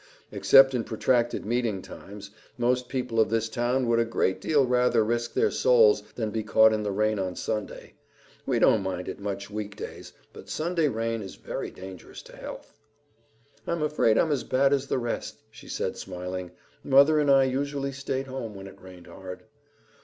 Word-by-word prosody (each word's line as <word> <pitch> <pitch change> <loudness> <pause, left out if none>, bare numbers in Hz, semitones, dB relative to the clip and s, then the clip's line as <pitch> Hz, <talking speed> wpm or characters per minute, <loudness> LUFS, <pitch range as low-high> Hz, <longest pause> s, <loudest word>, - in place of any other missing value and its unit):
Except 135 -1 +6
in 120 -2 0
protracted 120 +1 0
meeting 115 -4 -1
times, 100 0 -11 0.3
most 125 +1 0
people 125 -3 -2
of 110 -3 +4
this 115 0 0
town 120 +2 0
would 115 0 +3
a - - +4
great 115 -5 -1
deal 145 -4 +3
rather 125 -2 +3
risk 120 +1 -2
their 440 0 +2
souls 470 -3 +4
than 110 -3 -2
be 110 - -2
caught 110 +1 +5
in 110 - -1
the 105 -1 -2
rain 105 +1 0
on 95 -2 -3
Sunday. 105 -2 -5 0.5
We - - +1
don't 110 - +4
mind 90 -1 -4
it - - -6
much 100 0 -5
week 105 -1 -5
days, - - -8 0.2
but - - -12
Sunday 165 0 0
rain 115 -2 -2
is 95 - -8
very - - -5
dangerous 95 -1 -11
to - - -14
health." - - -9 0.9
"I'm 170 -2 -1
afraid 150 -7 +2
I'm 160 - +2
as 140 -4 0
bad 135 +2 +2
as 140 -1 0
the - - 0
rest," 120 -2 -4
she - - -14
said, - - -3
smiling. 90 0 -6 0.3
"Mother 140 +3 +5
and 145 -1 +2
I 135 -1 +6
usually 140 +1 -2
stayed 135 -1 -3
home 130 -5 -6
when 95 0 -9
it 95 - -13
rained 90 -2 -13
hard." 90 +1 -10
115 Hz, 185 wpm, -26 LUFS, 105-135 Hz, 0.9 s, Except